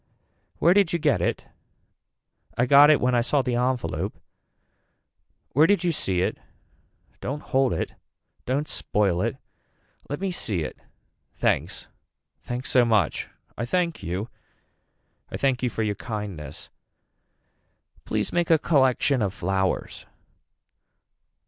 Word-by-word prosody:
Where 170 Hz, -, +5 dB
did 195 Hz, -4 st, +3 dB
you -, -, +2 dB
get 145 Hz, -, +1 dB
it. -, -, -1 dB, 1.1 s
I 125 Hz, -, +3 dB
got 145 Hz, +3 st, +8 dB
it 155 Hz, -, +5 dB
when 125 Hz, 0 st, +1 dB
I 120 Hz, -, +3 dB
saw 135 Hz, +3 st, +1 dB
the 125 Hz, -, -1 dB
envelope. 125 Hz, 0 st, -1 dB, 1.3 s
Where 150 Hz, +5 st, +5 dB
did 200 Hz, -3 st, +2 dB
you 175 Hz, -, +2 dB
see 95 Hz, -, -1 dB
it. -, -, -1 dB, 0.8 s
Don't 145 Hz, +3 st, -4 dB
hold 135 Hz, -1 st, +1 dB
it. -, -, -2 dB, 0.5 s
Don't 140 Hz, +4 st, 0 dB
spoil 95 Hz, -4 st, 0 dB
it. -, -, -1 dB, 0.7 s
Let 145 Hz, -, -3 dB
me 195 Hz, -1 st, -2 dB
see 100 Hz, -, -2 dB
it. -, -, -6 dB, 0.6 s
Thanks. -, -, -1 dB, 0.6 s
Thanks 125 Hz, +1 st, -5 dB
so 125 Hz, -, +5 dB
much. 110 Hz, -8 st, +1 dB, 0.3 s
I 120 Hz, -, -4 dB
thank 170 Hz, +6 st, -1 dB
you. 90 Hz, +6 st, -3 dB, 1.0 s
I -, -, -5 dB
thank 135 Hz, -2 st, +1 dB
you 125 Hz, -, +1 dB
for 115 Hz, -, -2 dB
your 105 Hz, -1 st, 0 dB
kindness. 100 Hz, -, -7 dB, 1.3 s
Please -, -, -2 dB
make 175 Hz, -1 st, +1 dB
a 165 Hz, -, +6 dB
collection 135 Hz, -3 st, +2 dB
of 100 Hz, -2 st, -1 dB
flowers. 95 Hz, +1 st, -2 dB
125 Hz, 130 wpm, -25 LUFS, 105-150 Hz, 1.3 s, got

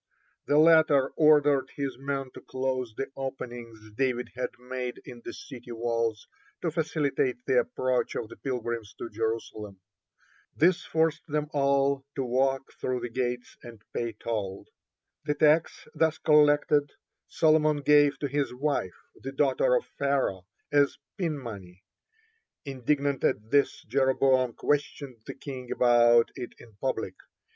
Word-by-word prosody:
The 145 Hz, -, +3 dB
latter 155 Hz, -4 st, +5 dB
ordered 145 Hz, -3 st, +4 dB
his 140 Hz, -2 st, -3 dB
men 135 Hz, -1 st, -3 dB
to -, -, -10 dB
close 130 Hz, -3 st, -3 dB
the 135 Hz, -, -4 dB
openings 120 Hz, -5 st, -7 dB
David 125 Hz, -1 st, -1 dB
had 125 Hz, 0 st, -3 dB
made 125 Hz, 0 st, -5 dB
in 120 Hz, -1 st, -10 dB
the -, -, -6 dB
city 120 Hz, -3 st, -10 dB
wall 115 Hz, -1 st, -1 dB, 0.5 s
to 165 Hz, -, 0 dB
facilitate 145 Hz, -6 st, -1 dB
the 130 Hz, -, +4 dB
approach 130 Hz, +1 st, -1 dB
of -, -, -3 dB
the -, -, -11 dB
pilgrims 120 Hz, -4 st, -4 dB
to 115 Hz, -, -7 dB
Jerusalem. 110 Hz, -2 st, -4 dB, 0.8 s
This 175 Hz, +2 st, +3 dB
forced 160 Hz, -1 st, 0 dB
them 150 Hz, 0 st, -2 dB
all 140 Hz, -1 st, +2 dB
the 135 Hz, -, -1 dB
walk 135 Hz, +2 st, 0 dB
through 125 Hz, -1 st, -1 dB
the 120 Hz, -, -4 dB
gates 125 Hz, 0 st, -3 dB
and 115 Hz, -3 st, -12 dB
pay 115 Hz, -1 st, -2 dB
toll. 100 Hz, -4 st, -4 dB, 0.6 s
The 150 Hz, -1 st, 0 dB
tax 155 Hz, +2 st, +2 dB
thus 160 Hz, -1 st, +1 dB
collected 145 Hz, -1 st, +4 dB, 0.3 s
Solomon 155 Hz, -2 st, +3 dB
gave 145 Hz, 0 st, +5 dB
to 145 Hz, -, 0 dB
his 145 Hz, 0 st, -1 dB
wife, 140 Hz, -9 st, -1 dB, 0.2 s
the 135 Hz, -, -8 dB
daughter 145 Hz, -, +2 dB
of -, -, 0 dB
Pharaoh, 135 Hz, -10 st, 0 dB, 0.2 s
as 145 Hz, -1 st, +3 dB, 0.2 s
pin 165 Hz, -5 st, -2 dB
money. 100 Hz, -8 st, -9 dB, 0.8 s
Indignant 140 Hz, +1 st, -1 dB
at 105 Hz, +3 st, 0 dB
this, 140 Hz, 0 st, +2 dB
Jeroboam 130 Hz, -2 st, +2 dB
questioned 145 Hz, -2 st, -2 dB
the -, -, -6 dB
king 135 Hz, -3 st, -8 dB
about 120 Hz, -1 st, +5 dB
it 120 Hz, -, -7 dB
in 115 Hz, -, -16 dB
public. 110 Hz, -6 st, -2 dB
135 Hz, 140 wpm, -28 LUFS, 120-145 Hz, 0.8 s, latter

